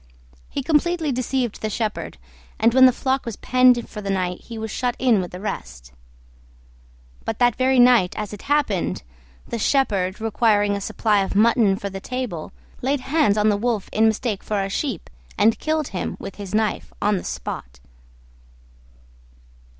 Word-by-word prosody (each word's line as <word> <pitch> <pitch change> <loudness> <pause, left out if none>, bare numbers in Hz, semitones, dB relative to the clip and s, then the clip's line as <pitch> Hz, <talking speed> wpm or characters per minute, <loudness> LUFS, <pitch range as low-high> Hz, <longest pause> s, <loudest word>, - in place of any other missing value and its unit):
He 280 - -4
completely 320 +1 +1
deceived 255 -2 -2
the 215 - -1
shepherd, 215 - -3 0.4
and 230 +1 +3
when 260 0 +8
the - - +5
flock 265 +2 -1
was 230 -4 -5
penned 255 -1 +3
for 210 - -8
the 200 - -5
night 180 -2 -1
he 230 - -8
was 220 -1 -5
shut 245 +1 -1
in 240 -6 +3
with 180 - -5
the 180 - -8
rest. - - -6 1.3
But 220 - -3
that 245 -2 +3
very 260 0 +2
night 245 -7 +5
as 210 -1 -4
it 205 - -8
happened, 280 -11 0 0.4
the 235 - -4
shepherd, 200 -8 +1
requiring 210 -2 +2
a 200 - -4
supply 210 +1 +1
of 195 - -3
mutton 215 -2 +4
for 200 -1 -5
the 195 0 -7
table, 250 -11 -4 0.3
laid 270 +1 0
hands 270 -6 +2
on 210 +1 +3
the 205 - +3
Wolf 225 -2 -1
in 220 +1 +4
mistake 220 -2 -1
for 210 -1 -2
a 195 - -3
Sheep, 235 - -3 0.3
and 220 +2 +3
killed 310 -2 -1
him 180 -1 -4
with - - -8
his 200 0 -5
knife 215 -1 -1
on 205 0 +1
the - - -5
spot. - - -6
220 Hz, 175 wpm, -22 LUFS, 200-255 Hz, 1.3 s, when